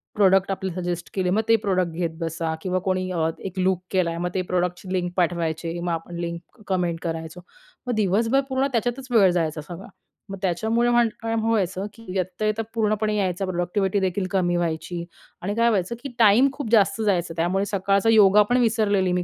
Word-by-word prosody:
Product 195 -1 +4
आपले 190 -1 -3
suggest 175 -1 -4
केले 185 -2 0
मग 210 +4 +2
ते 225 - +7
प्रॉडक्ट 185 -5 0
घेत 170 0 -2
बसा 165 0 -2
किंवा 185 0 -1
कोणी 185 0 0
अ, 165 -2 0 0.2
एक 190 0 -6
लूक 185 -1 +1
केलाय 170 -3 0
मग 175 +1 -2
ते 185 - 0
प्रॉडक्टची 180 +1 -2
लिंक 175 -1 -1
पाठवायचे 170 -1 -1
मग 175 0 -2
आपण 165 +1 -4
लिंक 170 +6 -7
कमेंट 175 -3 0
करायचो 165 +1 -5 0.5
मग 245 - 0
दिवसभर 225 +6 +2
पूर्ण 265 +1 +1
त्याच्यातच 245 +2 -2
वेळ 200 -6 +5
जायचा 160 -3 -1
सगळा 175 +5 -9 0.4
मग 195 - -6
त्याच्यामुळे 220 +7 +1
अ, 240 0 +4 0.2
काय 225 0 -2
व्हायचं 205 -4 0
की 230 0 -15
येता 185 +3 -2
येता 215 +1 0
पूर्णपणे 215 -1 0
यायचा 190 -1 -1
प्रॉडक्टिव्हिटीदेखील 185 +1 -1
कमी 175 -2 +1
व्हायची 170 +1 -2 0.4
आणि 200 +4 -3
काय 235 0 +3
व्हायचं 200 +1 0
की 275 - -4
टाईम 225 +5 +6
खूप 280 -7 -5
जास्त 220 0 +3
जायचं 175 -5 0
त्यामुळे 185 +4 +1
सकाळचा 200 +2 +1
योगा 210 -2 +6
पण 245 - +3
विसरलेली 205 -5 +2
मी. 180 0 0
185 Hz, 185 wpm, -24 LUFS, 175-215 Hz, 0.5 s, ते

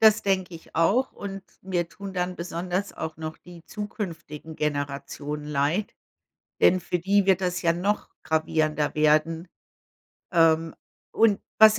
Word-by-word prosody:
Das 220 0 +6
denke 190 -3 0
ich 165 - -12
auch 220 +11 +3
und 195 -1 -6 0.2
mir 175 -3 -1
tun 195 +1 -8
dann 180 0 -2
besonders 180 +3 -3
auch 160 -1 -5
noch 155 0 -5
die 175 -2 -14
zukünftigen 165 -7 -6
Generationen 145 0 -3
leid, 150 +7 0 0.7
denn 185 - +6
für 180 0 -2
die 195 +3 +3
wird 190 -1 +4
das 180 -1 0
ja 170 0 +3
noch 200 +5 -1
gravierender 155 -1 +1
werden. 155 +3 +3 0.9
Ähm, 165 -1 +4 0.4
und 215 -3 +4 0.2
was 215 0 +8
175 Hz, 140 wpm, -26 LUFS, 160-195 Hz, 0.9 s, was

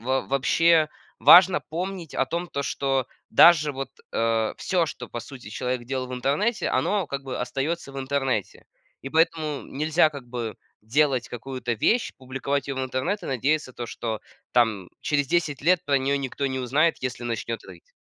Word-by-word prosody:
во 130 +2 0
вообще, 155 +4 +3 0.3
важно 180 +1 +8
помнить 175 0 -5
о 135 - +2
том, 170 +5 -3
то, 140 0 -3
что 135 -2 0 0.2
даже 155 -3 +7
вот, 135 -1 -5 0.2
э, 115 -1 +1
всё, 180 -3 +1
что 125 -4 -7
по 120 - -5
сути 120 -3 -11
человек 125 +2 -3
делал 130 0 -3
в - - -7
интернете, 145 - 0
оно 200 -5 +1
как 140 0 -4
бы 135 -1 -5
остается 135 +4 -3
в 135 - -6
интернете, 135 0 -2 0.4
и 135 - -5
поэтому 155 -1 +1
нельзя 155 +2 +2
как 140 -4 -9
бы 120 -3 -5 0.2
делать 130 +2 +1
какую-то 125 0 -4
вещь, 230 - +1
публиковать 135 +2 -3
ее 140 - -3
в 130 - -2
интернет 130 +11 -2
и - - -6
надеяться 135 +2 0
то, 120 -1 -6
что 110 -2 -4 0.3
там 110 -7 +2
через 145 -2 0
10 155 -5 0
лет 180 +2 +3
про 140 - +2
нее 135 +1 +1
никто 140 0 -4
не 130 - -3
узнает, 145 +6 +2
если 125 -1 -4
начнет 115 -1 -3
рыть. 90 -3 -15
135 Hz, 175 wpm, -25 LUFS, 125-155 Hz, 0.4 s, важно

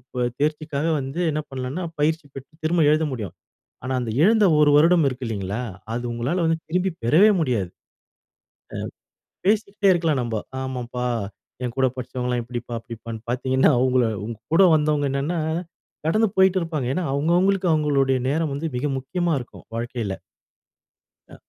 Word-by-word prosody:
ப 125 -1 +1
தேர்ச்சிக்காக 150 0 -1
வந்து 135 +4 -5
என்ன 155 +1 -1
பண்ணலான்னா, 135 +6 -4 0.2
பயிற்சி 155 +1 +1
பெற்று 135 +2 -10
திரும்ப 170 +1 +2
எழுத 155 +1 +3
முடியும். 110 -9 -5 0.5
ஆனா, 130 - -2
அந்த 120 -2 -3
இழந்த 215 +3 +5 0.2
1 150 -1 +6
வருடம் 165 +1 +5
இருக்கு 130 -1 -5
இல்லைங்களா, 100 +1 -3 0.3
அது 120 +1 -3
உங்களால 120 +9 -1
வந்து 160 0 +1
திரும்பி 180 +3 +1
பெறவே 165 - +6
முடியாது. 120 - 0 1.7
அ - - -69
பேசிக்கிட்டே 205 -1 +2
இருக்கலாம் 165 -6 +1
நம்ப. 115 -2 -2 0.2
ஆமாம்ப்பா, 125 -1 -4 0.6
என் 120 -1 -3
கூட 130 -1 +4
படிச்சவங்கள்லாம் 125 -1 -2
இப்படிப்பா, 120 0 -6
அப்படிப்பான்னு 115 -1 -8
பாத்தீங்கன்னா 130 +3 +3
அவுங்கள 130 -1 +3 0.2
உங்க 115 0 -6 0.2
கூட 170 - +7
வந்தவங்க 150 -1 +1
என்னான்னா, 145 +5 -1 0.7
கடந்து 215 +7 +3
போய்ட்டுருப்பாங்க. 175 -8 +2
ஏன்னா, 185 - -1
அவுங்கவுங்களுக்கு 180 +6 +2
அவுங்களுடைய 140 -4 +2
நேரம் 155 +1 0
வந்து 155 +4 -3
மிக 125 - -2
முக்கியமா 175 +5 -1
இருக்கும். 120 - -11
வாழ்க்கைல. 115 -3 -3 1.2
அ. - - -10
140 Hz, 140 wpm, -23 LUFS, 125-165 Hz, 1.7 s, கூட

